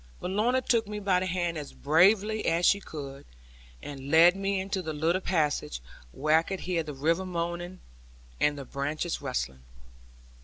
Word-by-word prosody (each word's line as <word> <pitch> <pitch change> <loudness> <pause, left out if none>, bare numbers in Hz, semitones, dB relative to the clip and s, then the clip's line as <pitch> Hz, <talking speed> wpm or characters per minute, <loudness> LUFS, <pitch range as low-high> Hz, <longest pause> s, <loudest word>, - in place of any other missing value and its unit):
But 180 - -4
Lorna 240 +6 +2
took 230 -3 +2
me 210 0 -5
by 195 -3 +2
the 185 - -2
hand 175 -2 -1
as 145 - -8
bravely 200 +8 +3
as 170 +1 +2
she 200 - +5
could, 140 -6 -8 0.6
and 140 -1 -7
led 165 +4 +7
me 195 0 -1
into 195 +1 -2
a 160 -4 -4
little 165 +5 +1
passage 150 - 0 0.3
where 155 - +3
I - - 0
could 190 +3 -5
hear 175 -2 -1
the 150 -3 -7
river 165 +6 +1
moaning 175 0 -4 0.6
and 150 0 +2
the 140 - -7
branches 150 +6 -3
rustling. 65 - -3
170 Hz, 170 wpm, -28 LUFS, 150-190 Hz, 0.6 s, led